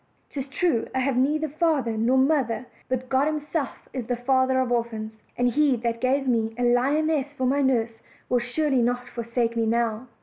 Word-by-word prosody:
'Tis 275 -1 -5
true 275 -3 0
I - - +2
have 265 0 0
neither 300 +5 +1
father 295 -6 0
nor 235 +4 +2
mother; 260 -4 +1 0.2
but 255 0 -2
God 265 +2 +2
Himself 305 -1 -3
is 255 -4 -4
the 245 - 0
Father 260 +1 +2
of 255 -2 0
orphans, 220 -2 -3 0.2
and 245 0 +2
He 290 0 +3
that 230 0 -3
gave 270 +1 +1
me 225 -2 0
a 245 - -1
lioness 280 +4 +2
for 260 -3 -2
my 275 +3 +2
nurse 235 -4 0 0.3
will 245 - +2
surely 260 +2 0
not 245 +1 0
forsake 235 0 -2
me 230 -1 +1
now." 230 +1 0
255 Hz, 190 wpm, -25 LUFS, 235-275 Hz, 0.3 s, He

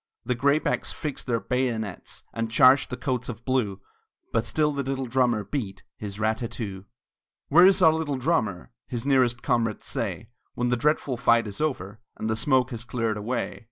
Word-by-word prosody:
The 125 - +1
graybacks 140 +5 +1
fixed 150 -3 -5
their 115 -2 +1
bayonets, 110 -2 -3
And 115 0 -2
charged 130 +4 +5
the 125 - -5
coats 125 -2 -2
of 120 0 -7
blue, 110 -7 0 0.5
But 115 0 +1
still 150 -1 +1
the 140 - -1
little 135 0 -2
drummer 120 -3 +1
beat 100 -2 -5
His 105 -1 -7
rat 110 0 +1
tat 115 - -3
too! 100 -5 -6 0.6
"Where 175 +5 +8
is 190 -1 +4
our 160 -2 +7
little 155 -4 -2
drummer?" 120 - -1 0.2
His 120 -1 -4
nearest 130 -3 +2
comrades 115 -5 0
say, - - -3 0.3
When 120 0 0
the 125 - +2
dreadful 140 0 0
fight 115 -2 +3
is 100 +3 -6
over, 110 -9 -2 0.2
And 110 - -2
the - - +1
smoke 130 +2 +2
has 115 -1 -5
cleared 115 -2 -2
away. 115 +4 -3
120 Hz, 185 wpm, -26 LUFS, 110-135 Hz, 0.6 s, Where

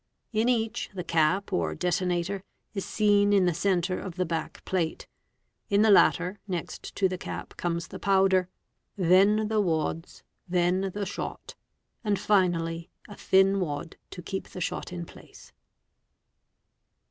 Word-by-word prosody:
In 220 +3 +2
each 225 -3 0
the 180 - -3
cap 170 +4 +1
or 80 -2 0
detonater 180 - -1 0.3
is 195 -3 -3
seen 205 -1 +3
in 195 -2 +4
the 175 - +2
centre 185 +1 0
of 185 -2 -7
he 185 - +2
back 165 -2 -4
plate. 170 -4 -1 0.6
In 200 +1 +4
the 220 - +5
latter, 185 0 +4
next 180 -4 -5
to 190 - +3
the 185 -1 -5
cap - - -7
comes 170 0 -2
the - - -8
powder, 190 -1 +3 0.5
then 200 +4 +4
1e 215 -1 +1
wads, 165 -1 -2 0.3
then 180 +2 +1
the 205 -1 -2
shot, 195 - -6 0.5
and 210 -2 +1
finally 170 -4 +1 0.2
a 205 - -10
thin 195 +1 +3
wad 155 -2 -4
to 180 - -9
keep 190 +3 -4
the - - -9
shot 180 - -3
in 175 -1 -5
place. - - -15
185 Hz, 145 wpm, -27 LUFS, 170-200 Hz, 0.6 s, the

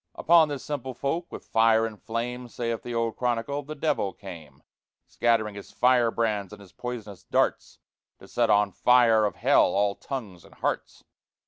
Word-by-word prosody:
Upon 165 -1 +5
this 140 -3 -5
simple 130 -4 -4
folk 165 +7 -3
"with - - -9
fire 115 0 +3
and 110 -2 -7
flame," 125 +2 -4
Saith 115 -1 -3
the 120 -1 -6
old 115 -1 -1
Chronicle, 125 +3 -1
"the 150 +2 -8
Devil 140 - -1
came; 80 -9 -12 0.4
Scattering 115 -3 +1
his 100 0 -10
firebrands 115 -5 +1
and 105 - -11
his 100 -3 -15
poisonous 110 -6 -7
darts, - - 0 0.4
To - - -15
set - - 0
on 105 -1 +3
fire 115 +1 +4
of 105 - -2
Hell - - +4
all 100 0 +2
tongues 105 - -7
and - - -18
hearts! - - -3
115 Hz, 165 wpm, -26 LUFS, 105-125 Hz, 0.4 s, Upon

